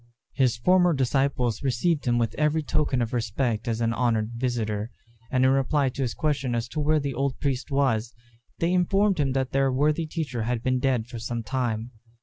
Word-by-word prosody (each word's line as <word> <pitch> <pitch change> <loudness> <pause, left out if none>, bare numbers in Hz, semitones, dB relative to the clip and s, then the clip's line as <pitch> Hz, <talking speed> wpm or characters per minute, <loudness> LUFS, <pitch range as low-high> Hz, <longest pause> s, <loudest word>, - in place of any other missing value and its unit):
His 130 -4 +2
former 180 +6 +4
disciples 130 -3 0
received 140 +4 0
him 120 0 +3
with 115 -2 0
every 150 +1 +1
token 140 -4 0
of 115 - -5
respect 115 0 -1
as 115 0 -1
an 115 0 +1
honoured 115 -2 0
visitor; 115 -3 -2 0.4
and 130 0 +2
in 130 - +5
reply 135 +1 +2
to 135 +2 -6
his 125 -3 -1
question 140 -5 -1
as 115 0 -2
to 150 - -4
where 155 +1 +2
the 140 -2 -3
old 135 0 -2
priest 135 -3 -2
was, 125 -5 0 0.4
they 170 +2 +1
informed 195 +1 +2
him 135 -3 +1
that 130 -1 -1
their 135 0 +2
worthy 150 +5 +1
teacher 145 -7 -3
had 115 +1 -2
been 130 -1 +1
dead 130 -4 +1
for 120 -1 -8
some 115 0 -4
time. 120 -1 -2
130 Hz, 195 wpm, -26 LUFS, 120-145 Hz, 0.4 s, in